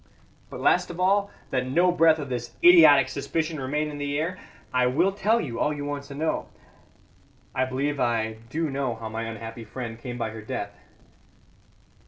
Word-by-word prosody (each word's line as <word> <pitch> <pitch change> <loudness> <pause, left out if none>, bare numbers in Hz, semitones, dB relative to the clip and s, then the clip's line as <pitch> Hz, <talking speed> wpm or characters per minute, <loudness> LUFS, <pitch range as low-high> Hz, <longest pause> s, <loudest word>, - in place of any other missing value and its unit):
"But - - -8
last - - +3
of 175 0 -7
all, 200 +2 +2 0.2
that 130 -1 0
no 175 +7 +3
breath 165 -2 +4
of 145 -3 -5
this 120 -2 -5
idiotic 155 -6 +8
suspicion 155 +4 -3
remain 150 +3 -2
in 145 - -7
the 145 0 -2
air, 170 +4 -2 0.3
I 125 0 +3
will 165 +10 +2
tell 210 +4 +1
you 125 - -4
all 150 - +1
you 145 -1 -4
want 145 -1 -4
to 140 -1 -9
know. 160 +2 -1 1.1
I 130 - +1
believe 140 +3 -2
I 110 -3 0
do 160 +1 -2
know 135 -3 -2
how 110 0 -7
my 110 +1 -4
unhappy 115 +1 -7
friend 115 0 -7
came 120 0 -6
by 115 -2 -3
her 110 0 -8
death. 100 -1 -5
140 Hz, 185 wpm, -26 LUFS, 120-160 Hz, 1.1 s, idiotic